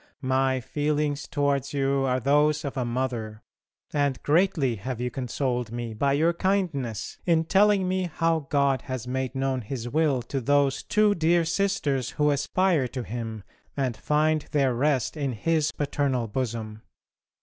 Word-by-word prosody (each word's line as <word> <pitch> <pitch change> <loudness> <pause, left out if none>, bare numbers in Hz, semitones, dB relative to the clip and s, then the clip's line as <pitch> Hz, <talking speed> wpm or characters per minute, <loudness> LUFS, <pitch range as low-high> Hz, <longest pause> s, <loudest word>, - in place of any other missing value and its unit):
My 130 0 +1
feelings 150 +2 -1
towards 140 -1 0
you 135 0 +1
are 130 0 +1
those 150 +3 +2
of 140 - -4
a 130 - -1
mother, 120 -3 -3 0.5
and 140 -4 +1
greatly 150 - +2
have 120 +4 -5
you 125 0 -2
consoled 125 -2 -2
me 120 -1 -4
by 140 +5 +1
your 160 +4 +3
kindness 170 - -1
in 165 -2 +4
telling 195 +2 +3
me 185 -1 -1
how 165 -2 0
God 140 -3 +2
has 130 -3 -5
made 130 +1 -2
known 135 -1 -1
His 120 +1 -5
will 140 -2 +1
to 135 +3 -3
those 140 +1 +2
two 210 -1 +3
dear 170 -1 +2
sisters 160 -8 0
who 150 -1 +3
aspire 150 +1 +1
to 125 0 -5
Him 115 -2 -5 0.3
and 130 -4 0
find 155 +4 +1
their 135 -4 +2
rest 135 +2 +1
in 140 -4 -2
His 155 +6 0
paternal 140 -4 -1
bosom. 110 -2 -4
140 Hz, 155 wpm, -26 LUFS, 125-155 Hz, 0.5 s, in